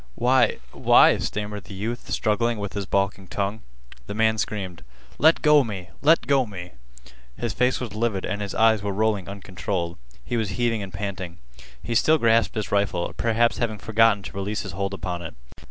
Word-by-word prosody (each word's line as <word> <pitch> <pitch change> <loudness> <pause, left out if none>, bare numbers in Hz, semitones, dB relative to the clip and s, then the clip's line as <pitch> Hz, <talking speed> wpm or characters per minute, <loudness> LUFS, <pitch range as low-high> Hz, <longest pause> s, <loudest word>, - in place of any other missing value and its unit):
"Why—why—" 120 - +4
stammered 105 -2 -4
the 100 - -10
youth 115 +5 -5
struggling 115 +1 0
with 100 -1 -5
his 100 -2 -4
balking 100 -1 -1
tongue. 100 +3 -3 0.5
The 100 - -5
man 110 0 +2
screamed: 95 -6 -4 0.4
"Let 160 +3 +4
go 150 -2 +6
me! 95 -6 -7
Let 155 -4 +4
go 135 -2 +2
me!" 90 -3 -8 0.7
His 120 -2 -2
face 125 +1 +1
was 120 -5 -5
livid 110 -3 -1
and 105 -1 -3
his 100 -2 -4
eyes 110 -2 +4
were 100 -1 -2
rolling 105 -3 0
uncontrolled. 95 -3 -4 0.3
He 120 - -2
was 110 -3 -1
heaving 120 -3 +1
and 95 -1 -6
panting. 95 -2 -5 0.5
He 120 - -3
still 155 +7 +4
grasped 115 -4 +3
his 110 -2 -3
rifle, 100 -4 0
perhaps 115 0 +1
having 110 -3 -1
forgotten 110 0 +3
to - - -8
release 100 +2 -2
his 100 - -6
hold 100 +2 -3
upon 90 -1 -4
it. 80 - -8
105 Hz, 180 wpm, -24 LUFS, 100-115 Hz, 0.7 s, go